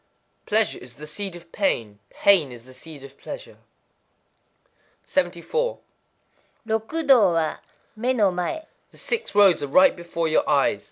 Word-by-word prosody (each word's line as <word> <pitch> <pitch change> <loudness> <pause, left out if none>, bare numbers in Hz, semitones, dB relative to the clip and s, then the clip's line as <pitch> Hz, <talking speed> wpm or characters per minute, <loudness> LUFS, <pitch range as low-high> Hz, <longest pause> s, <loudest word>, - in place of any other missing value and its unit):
_ - - -44
Pleasure 215 +1 +1
is 125 -1 -13
the 150 - -10
seed 190 +4 -5
of 170 -1 -14
pain; 115 - -1
pain 180 -9 +3
is 120 -1 -12
the 130 - -14
seed 145 +2 -12
of 140 0 -14
pleasure. - - -9 1.5
74.—Rokudō 265 - -1
wa, 160 -2 -1 0.4
mé 245 +4 0
no 205 -5 +3
maë. 180 - -3 0.2
The - - -20
Six 465 - -4
Roads 200 -4 +5
are 145 - -3
right 185 +7 +5
before 170 -1 -3
your 160 - +1
eyes. 140 -8 +2
180 Hz, 145 wpm, -23 LUFS, 150-220 Hz, 1.5 s, Roads